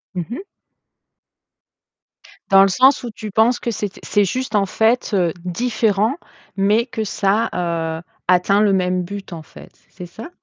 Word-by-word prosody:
Mmh 175 Hz, -2 st, -2 dB
mh. 240 Hz, -, -5 dB, 2.1 s
Dans 195 Hz, -1 st, +7 dB
le -, -, +4 dB
sens 255 Hz, +9 st, +4 dB
où 240 Hz, -, -5 dB
tu 215 Hz, 0 st, -8 dB
penses 225 Hz, +4 st, +2 dB
que -, -, -3 dB
c'étai 205 Hz, -3 st, -4 dB
c'est 205 Hz, -1 st, +2 dB
juste 250 Hz, +3 st, -3 dB
en 200 Hz, -1 st, +3 dB
fait, 225 Hz, +6 st, +1 dB
heu, 175 Hz, -4 st, +1 dB
différent, 220 Hz, +3 st, 0 dB, 0.4 s
mais 210 Hz, +4 st, +2 dB
que 230 Hz, -3 st, -4 dB
ça, 210 Hz, +2 st, 0 dB
heu, 165 Hz, -2 st, -2 dB, 0.3 s
atteint 185 Hz, +3 st, +3 dB
le 205 Hz, -2 st, +3 dB
même 180 Hz, -1 st, 0 dB
but 200 Hz, +1 st, -8 dB
en 160 Hz, -2 st, -8 dB
fait, -, -, -15 dB, 0.2 s
c'est 180 Hz, -, -10 dB
ça? 220 Hz, -, -10 dB
200 Hz, 160 wpm, -19 LUFS, 180-225 Hz, 2.1 s, Dans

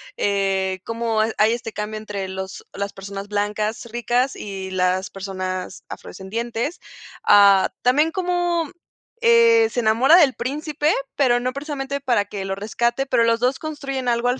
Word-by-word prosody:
eh, 195 Hz, -2 st, 0 dB
como 230 Hz, -1 st, -1 dB
ha 220 Hz, +1 st, +1 dB
hay 215 Hz, +2 st, +4 dB
este 230 Hz, -2 st, -5 dB
cambio 210 Hz, +1 st, -4 dB
entre 205 Hz, -3 st, -5 dB
los 190 Hz, 0 st, -7 dB
las 200 Hz, 0 st, -4 dB
personas 195 Hz, +1 st, -7 dB
blancas 210 Hz, +2 st, -2 dB
ricas 240 Hz, +3 st, 0 dB
y 195 Hz, -2 st, -6 dB
las 185 Hz, 0 st, 0 dB
personas 185 Hz, -1 st, -5 dB
afrodescendientes, 230 Hz, -, -5 dB, 0.4 s
ah, 200 Hz, -2 st, +6 dB
también 295 Hz, +6 st, +3 dB
como, 350 Hz, -3 st, 0 dB, 0.5 s
eh, 465 Hz, -1 st, +5 dB
se -, -, -2 dB
enamora 240 Hz, +8 st, +5 dB
del 290 Hz, -7 st, +5 dB
príncipe, 300 Hz, +3 st, -1 dB, 0.2 s
pero 245 Hz, -4 st, +3 dB
no 250 Hz, +1 st, -1 dB
precisamente 280 Hz, 0 st, -4 dB
para 240 Hz, -7 st, +1 dB
que 200 Hz, -1 st, -6 dB
lo 195 Hz, -, -2 dB
rescate, 235 Hz, +6 st, -1 dB
pero 245 Hz, -3 st, +3 dB
los 230 Hz, 0 st, +2 dB
2 250 Hz, +3 st, +1 dB
construyen 275 Hz, -4 st, -5 dB
algo 240 Hz, 0 st, +1 dB
al 250 Hz, +1 st, 0 dB
230 Hz, 155 wpm, -22 LUFS, 200-275 Hz, 0.5 s, ah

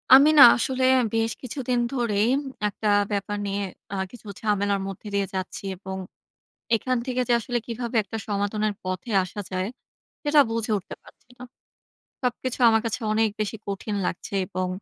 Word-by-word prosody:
আমি 285 Hz, +3 st, +7 dB
না -, -, +13 dB
আসলে 260 Hz, +1 st, -1 dB, 0.3 s
বেশ 225 Hz, 0 st, +1 dB
কিছুদিন 250 Hz, -1 st, -2 dB
ধরেই 230 Hz, -5 st, +1 dB, 0.4 s
একটা 210 Hz, +1 st, -3 dB, 0.2 s
ব্যাপার 205 Hz, +1 st, -2 dB
নিয়ে 200 Hz, 0 st, -2 dB, 0.3 s
আ -, -, -1 dB, 0.2 s
কিছু 235 Hz, -3 st, -13 dB
ঝামেলার 205 Hz, -2 st, +1 dB
মধ্যে 195 Hz, +2 st, -8 dB
দিয়ে 200 Hz, -1 st, +1 dB
যাচ্ছি। 185 Hz, +1 st, -4 dB
এবং 190 Hz, +1 st, -7 dB, 0.8 s
এখান 255 Hz, +3 st, 0 dB
থেকে 255 Hz, -1 st, -1 dB
যে 240 Hz, -, +3 dB
আসলে 240 Hz, +2 st, -2 dB
কীভাবে 235 Hz, 0 st, -4 dB
একটা 215 Hz, +3 st, -6 dB
সমাধানের 210 Hz, +1 st, 0 dB
পথে 185 Hz, +4 st, -4 dB
আসা 185 Hz, +3 st, -8 dB
যায়, 185 Hz, 0 st, -2 dB, 0.6 s
সেটা 295 Hz, 0 st, +4 dB
বুঝে 225 Hz, -1 st, -2 dB
উঠতে 195 Hz, +1 st, -8 dB
পারছি -, -, -20 dB
না। 250 Hz, -, -10 dB, 0.8 s
সবকিছু 250 Hz, +1 st, -2 dB
আমার 225 Hz, 0 st, +3 dB
কাছে 230 Hz, -, -2 dB
অনেক 220 Hz, 0 st, +3 dB
বেশি 215 Hz, +1 st, -2 dB
কঠিন 200 Hz, +1 st, -3 dB
লাগছে, 180 Hz, -, -4 dB
এবং 185 Hz, +1 st, -2 dB
215 Hz, 160 wpm, -25 LUFS, 200-240 Hz, 0.8 s, না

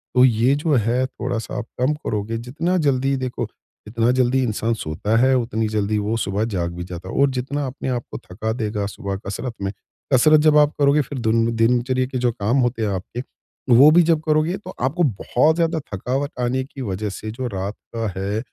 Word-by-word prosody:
तो 125 Hz, 0 st, +7 dB
ये 120 Hz, +2 st, +3 dB
जो 150 Hz, +1 st, 0 dB
है 120 Hz, +2 st, +1 dB
थोड़ा-सा 125 Hz, -3 st, -4 dB
आप 120 Hz, -, -3 dB, 0.2 s
कम 130 Hz, +4 st, +3 dB
करोगे, 110 Hz, -6 st, -3 dB
जितना 150 Hz, +10 st, -1 dB
जल्दी 135 Hz, -4 st, +1 dB
देखो 130 Hz, -2 st, -3 dB, 0.4 s
जितना 115 Hz, +2 st, +1 dB
जल्दी 130 Hz, +1 st, +2 dB
इंसान 115 Hz, 0 st, 0 dB
सोता 105 Hz, +2 st, -2 dB
है 130 Hz, +2 st, +4 dB
उतनी 115 Hz, -2 st, -1 dB
जल्दी 105 Hz, 0 st, 0 dB
वो 105 Hz, +2 st, -1 dB
सुबह 105 Hz, 0 st, -1 dB
जाग 90 Hz, -6 st, -2 dB
भी 90 Hz, -, -5 dB
जाता 90 Hz, +1 st, -8 dB
है -, -, -6 dB
और 140 Hz, -, +5 dB
जितना 135 Hz, +3 st, -2 dB
अपने 130 Hz, +1 st, -5 dB
आपको 120 Hz, -2 st, -4 dB
थका 105 Hz, +5 st, -5 dB
देगा 105 Hz, -3 st, -2 dB
सुबह 100 Hz, -1 st, -5 dB
कसरत 115 Hz, +5 st, -4 dB
में 95 Hz, 0 st, -1 dB, 0.4 s
कसरत 155 Hz, +5 st, +6 dB
जब 150 Hz, 0 st, +5 dB
आप 150 Hz, 0 st, +4 dB
करोगे 145 Hz, +1 st, +4 dB
फिर 140 Hz, 0 st, -6 dB
दिन 115 Hz, 0 st, +1 dB
दिनचर्या 125 Hz, +3 st, +2 dB
के 130 Hz, 0 st, -4 dB
जो 120 Hz, -1 st, +1 dB
काम 110 Hz, +3 st, 0 dB
होते 120 Hz, -2 st, 0 dB
हैं 105 Hz, -, +1 dB
आपके 100 Hz, +6 st, -4 dB, 0.5 s
वो 130 Hz, +5 st, +8 dB
भी 175 Hz, +3 st, +6 dB
जब 165 Hz, -1 st, +3 dB
करोगे, 155 Hz, +4 st, +2 dB
तो 185 Hz, -2 st, -10 dB
आपको 150 Hz, +8 st, +1 dB
बहुत 135 Hz, -, +2 dB
ज़्यादा 165 Hz, -1 st, +1 dB
थकावट 135 Hz, +9 st, -2 dB
आने 125 Hz, +2 st, 0 dB
की 135 Hz, 0 st, -10 dB
वजह 105 Hz, -1 st, -3 dB
से 110 Hz, +2 st, -6 dB
जो 125 Hz, +3 st, -4 dB
रात 100 Hz, -2 st, -4 dB, 0.2 s
का 115 Hz, -1 st, -1 dB
है, 100 Hz, +3 st, -1 dB
120 Hz, 205 wpm, -21 LUFS, 110-135 Hz, 0.5 s, वो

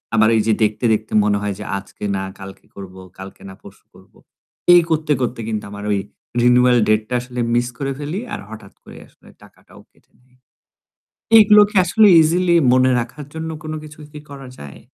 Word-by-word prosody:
আমার 110 Hz, 0 st, +4 dB
এই 110 Hz, -, +2 dB
যে 110 Hz, -, +3 dB
দেখতে, 105 Hz, +3 st, -2 dB
দেখতে 110 Hz, 0 st, -4 dB
মনে 105 Hz, -1 st, +1 dB
হয় 105 Hz, -1 st, -3 dB
যে -, -, -6 dB
আজকে 100 Hz, +1 st, -12 dB
না 95 Hz, -, -4 dB, 0.2 s
কালকে 95 Hz, 0 st, -12 dB
করবো, 95 Hz, -1 st, -11 dB, 0.2 s
কালকে 95 Hz, 0 st, -11 dB
না -, -, -11 dB
পরশু -, -, -17 dB
করবো। -, -, -21 dB, 0.6 s
এই 175 Hz, -, +7 dB
করতে, 155 Hz, -1 st, -1 dB
করতে 120 Hz, -1 st, -3 dB
কিন্তু 110 Hz, -2 st, -4 dB
আমার 100 Hz, 0 st, -9 dB
ওই 100 Hz, -, 0 dB, 0.4 s
রিনিউয়াল 125 Hz, 0 st, +4 dB
ডেটটা 110 Hz, +2 st, 0 dB
আসলে 125 Hz, 0 st, -9 dB, 0.2 s
মিস 120 Hz, 0 st, 0 dB
করে 135 Hz, +1 st, -4 dB
ফেলি 150 Hz, +6 st, -5 dB
আর -, -, -4 dB
হঠাৎ 110 Hz, -3 st, -12 dB
করে -, -, -14 dB
আসলে -, -, -25 dB
টাকাটাও -, -, -20 dB
কেটে -, -, -34 dB
নেয়। 125 Hz, 0 st, -32 dB, 1.0 s
এগুলোকে 210 Hz, -1 st, +5 dB
আসলে 215 Hz, +4 st, +3 dB
ইজিলি 170 Hz, +2 st, +1 dB, 0.2 s
মনে 130 Hz, 0 st, +3 dB
রাখার 130 Hz, +5 st, -7 dB
জন্য 160 Hz, 0 st, -5 dB
কোন 155 Hz, -, -7 dB
কিছু 150 Hz, -1 st, -14 dB
কি 150 Hz, -, -9 dB
করা 135 Hz, -1 st, -10 dB
যায়? 70 Hz, -1 st, -11 dB
125 Hz, 185 wpm, -18 LUFS, 105-155 Hz, 1.0 s, এই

